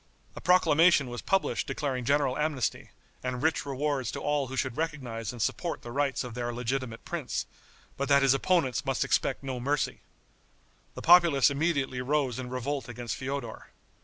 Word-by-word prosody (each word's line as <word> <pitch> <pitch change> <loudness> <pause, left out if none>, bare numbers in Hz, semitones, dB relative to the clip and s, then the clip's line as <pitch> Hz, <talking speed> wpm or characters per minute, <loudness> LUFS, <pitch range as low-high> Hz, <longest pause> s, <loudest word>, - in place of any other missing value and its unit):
A - - -8
proclamation 165 -5 +4
was 120 - -5
published 195 0 0
declaring 130 -5 -2
general 140 -1 +2
amnesty, 150 -4 -1 0.3
and 125 0 -3
rich 160 -2 +1
rewards 140 -3 -1
to - - -4
all 145 -2 0
who 130 - -6
should 130 -3 -1
recognize 130 -9 -3
and 120 - -10
support 170 - -2
the 120 - -7
rights 140 -1 0
of 125 -2 -7
their 120 0 -3
legitimate 125 0 -3
prince, - - -3 0.5
but 140 +1 -2
that 140 -1 +5
his 135 -1 +5
opponents 135 -3 +1
must - - 0
expect - - 0
no 130 -2 -4
mercy. 140 +3 -1 1.0
The - - -7
populace 170 -6 +6
immediately 140 -4 0
rose 135 -2 0
in 125 -1 -5
revolt 130 0 -3
against 120 -1 -4
Feodor. 130 -3 -5
135 Hz, 165 wpm, -29 LUFS, 125-145 Hz, 1.0 s, populace